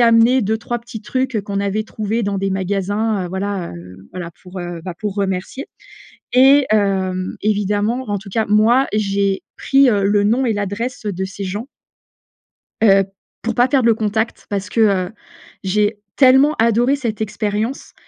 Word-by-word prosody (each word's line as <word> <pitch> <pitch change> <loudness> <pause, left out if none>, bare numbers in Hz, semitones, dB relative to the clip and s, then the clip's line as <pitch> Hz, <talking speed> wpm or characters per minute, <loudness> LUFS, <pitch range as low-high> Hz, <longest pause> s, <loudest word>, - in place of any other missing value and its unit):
amené 235 +2 +5
2-3 220 +3 -2
petits 235 -2 -9
trucs, 255 +2 -2
heu, - - +1
qu'on 200 0 -3
avait 200 +2 -1
trouvés 220 +1 -2
dans 200 -1 -1
des 195 0 -1
magasins, 200 +2 -1
heu, - - -7
voilà, 190 - -3
heu, 90 +2 -12
voilà 180 -2 -6
pour, 185 0 -9
heu, 175 -1 -5
bah, 180 -2 -5
pour 210 -2 -3
remercier. 195 +6 -3 0.7
Et 270 +2 +6
hem, 190 -3 0
évidemment, 210 +4 0
en 205 - 0
tout 195 +1 -10
cas 220 +3 0
moi, 230 +6 +4
j'ai 200 -2 0
pris, 275 0 +4
heu, 205 -4 +1
le 205 +1 +3
nom 235 +6 +2
et 225 - +1
l'adresse, 205 +4 -4
heu, 205 - -1
de 190 +2 -3
ces 200 +1 -7
gens 205 +6 -4 1.1
heu, 195 -3 +6 0.4
pour 230 0 -2
pas 245 +1 +4
perdre 260 -3 +2
le 230 - +6
contact. 220 +1 -2
Parce 200 -1 -3
que, 230 - +1
heu, 195 -3 +2 0.5
j'ai 205 +2 0 0.2
tellement 270 +2 +5
adoré 235 +4 +3
cette 230 -6 -4
expérience 215 +4 -3
210 Hz, 175 wpm, -19 LUFS, 195-230 Hz, 1.1 s, Et